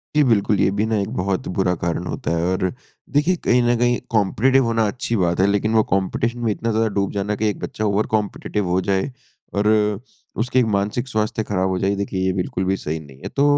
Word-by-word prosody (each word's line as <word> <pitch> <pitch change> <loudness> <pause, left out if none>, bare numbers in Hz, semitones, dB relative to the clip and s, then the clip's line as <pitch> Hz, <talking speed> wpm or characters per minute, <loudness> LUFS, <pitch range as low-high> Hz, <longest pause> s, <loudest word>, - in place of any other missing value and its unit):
जी 150 - +5
बिल्कुल। 105 -4 +2
ये - - +4
भी 105 +2 0
ना 110 -1 0
एक 100 - -3
बहुत 95 +1 -1
बुरा 90 -1 +2
कारण 85 -1 -2
होता - - -3
है 85 - 0
और 95 0 0 0.4
देखिए 160 +6 +3
कहीं 125 0 +4
न 120 0 +3
कहीं 120 0 +2
कॉम्पिटिटिव 120 +5 +3
होना 115 -1 +1
अच्छी 115 +1 -2
बात 85 +1 0
है 95 - +4
लेकिन 105 +2 +1
वो 110 - +5
कॉम्पिटिशन 115 +5 0
में 115 -2 0
इतना 115 +2 -2
ज़्यादा 110 +1 +2
डूब 100 - 0
जाना 105 +1 -1
कि 110 - +3
एक - - -4
बच्चा 110 - -3
ओवर 105 +1 +1
कॉम्पिटिटिव 105 -1 -2
हो 90 +1 +2
जाए 95 +7 0 0.4
और 105 +1 +1 0.7
उसकी 125 +2 +2
एक 125 - +3
मानसिक 105 +6 -1
स्वास्थ्य 110 -2 -1
ख़राब 95 -2 0
हो 95 - 0
जाए 100 +1 +1
देखिए, 100 -1 -3
ये 95 - +2
बिल्कुल 95 0 -2
भी 95 +1 +1
सही 80 -1 -4
नहीं 70 -4 -14
है। - - -7
तो 140 - +3
105 Hz, 230 wpm, -21 LUFS, 95-115 Hz, 0.7 s, जी